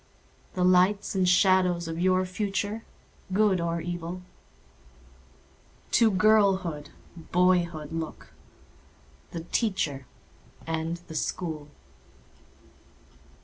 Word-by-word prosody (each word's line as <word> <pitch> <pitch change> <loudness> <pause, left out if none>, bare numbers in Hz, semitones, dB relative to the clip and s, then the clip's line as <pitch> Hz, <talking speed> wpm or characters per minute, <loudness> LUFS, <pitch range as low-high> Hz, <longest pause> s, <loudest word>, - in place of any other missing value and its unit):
The 180 - +1
lights 185 +3 +3
and 185 -2 +2
shadows 180 -2 +3
of 165 0 -4
your 185 +1 +2
future—good 205 0 -2
or 170 0 -1
evil? 175 +1 -5 1.7
To 230 -2 +5
girlhood, 190 -7 +2 0.4
boyhood 175 -4 +2
look—the 160 - -10
Teacher 150 - -1 0.6
and 165 +1 -2
the - - -9
School. 155 -1 -3
180 Hz, 75 wpm, -27 LUFS, 165-190 Hz, 1.7 s, To